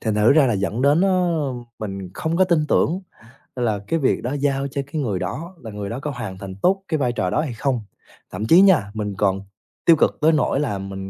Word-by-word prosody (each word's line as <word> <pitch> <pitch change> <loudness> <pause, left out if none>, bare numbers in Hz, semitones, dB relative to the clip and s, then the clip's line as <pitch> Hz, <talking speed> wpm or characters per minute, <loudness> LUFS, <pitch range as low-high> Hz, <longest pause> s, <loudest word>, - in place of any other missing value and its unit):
Thành 110 -2 -1
thử 105 +4 +5
ra 145 -2 +5
là 120 - +1
dẫn 100 +4 -1
đến, 145 +4 +4
ờ, 175 -7 +1 0.3
mình 95 -3 -6
không 160 +1 -2
có 185 - +5
tin 170 -4 +1
tưởng 175 +5 +2 0.6
là 115 -5 0
cái 165 - 0
việc 135 - +1
đó 125 +3 -2
giao 140 -1 0
cho 140 +1 -3
cái 155 - -2
người 105 -9 -1
đó 135 - -5
là 110 - -8
người 100 -1 -5
đó 120 +5 -4
có 150 +1 -4
hoàn 110 -8 -6
thành 95 -1 -8
tốt 190 - +1
cái 155 - 0
vai 125 -4 0
trò 95 -6 -1
đó 150 - +1
hay 150 -6 -4
không. 125 0 -1 0.5
Thậm 100 +4 -4
chí 175 +8 +7
nha, 165 - +4
mình 105 -2 -3
còn 95 -1 +1 0.4
tiêu 165 - +7
cực - - +1
tới 155 +2 +5
nỗi 150 -3 +1
là 130 -9 -1
mình 95 0 -6
130 Hz, 245 wpm, -22 LUFS, 105-155 Hz, 0.6 s, chí